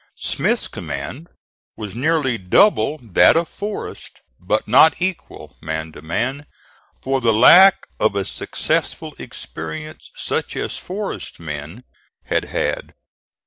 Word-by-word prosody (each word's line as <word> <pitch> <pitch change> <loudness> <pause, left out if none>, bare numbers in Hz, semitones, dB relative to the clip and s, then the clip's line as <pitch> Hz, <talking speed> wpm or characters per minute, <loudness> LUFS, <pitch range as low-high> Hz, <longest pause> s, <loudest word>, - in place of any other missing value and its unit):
Smith's - - -1
command 125 - -6 0.5
was 105 -3 -6
nearly 135 0 +1
double 115 - +3
that 110 - +5
of 165 0 +1
Forrest, 205 +5 -7 0.2
but 105 +4 -1
not 160 - +6
equal, 185 0 -4
man 80 0 -4
to 75 - -12
man, 130 - -3 0.6
for 135 0 0
the 115 -2 +4
lack 180 - +7
of 110 -2 +2
a 100 -1 -1
successful - - -2
experience 155 - -8
such - - -3
as - - -3
Forrest's 200 - -6
men 80 +7 -7 0.4
had - - 0
had. - - -3
120 Hz, 120 wpm, -20 LUFS, -, 0.6 s, lack